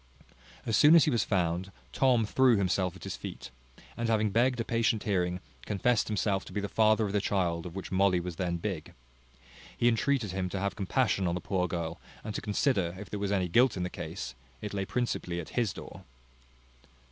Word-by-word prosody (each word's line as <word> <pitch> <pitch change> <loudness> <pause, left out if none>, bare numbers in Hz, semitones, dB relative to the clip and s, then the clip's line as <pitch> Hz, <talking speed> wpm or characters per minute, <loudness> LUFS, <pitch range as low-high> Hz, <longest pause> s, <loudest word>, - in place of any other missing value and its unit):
As 110 - +1
soon 150 +8 +7
as 165 - +7
he 150 - +2
was 115 -4 +2
found, 90 -1 -1 0.2
Tom 125 -4 +3
threw 130 +2 +4
himself 95 -1 0
at 95 - -12
his - - -4
feet, 65 -1 -8 0.4
and 115 -1 -2
having 110 -2 +2
begged 125 +3 +2
a - - +1
patient 115 -2 +1
hearing, 90 -3 0 0.3
confessed 110 +3 +1
himself 100 -2 0
to - - -11
be 105 - -2
the 100 - -2
father 110 +1 +3
of 100 - -3
the 105 - +2
child 90 -4 0
of 85 - -10
which 95 - -6
Molly 95 -1 +3
was 85 -1 -6
then 90 -2 -1
big. 85 -3 -5 0.8
He 120 - +3
entreated 120 -2 +1
him 95 -1 -2
to 95 - -3
have 100 +1 -2
compassion 100 -1 +1
on 85 - 0
the - - -2
poor 90 -2 -1
girl, 85 -1 -4 0.2
and 110 - -5
to - - -3
consider, 100 - 0
if 100 0 -9
there 105 - -3
was 100 0 -1
any 95 -3 +1
guilt 120 +6 +3
in 90 - -1
the 90 - -3
case, 65 +1 -6 0.3
it 105 - -6
lay 100 -1 -1
principally 95 -6 -2
at 85 - -7
his 120 -6 0
door. - - -10
100 Hz, 210 wpm, -30 LUFS, 90-115 Hz, 0.8 s, soon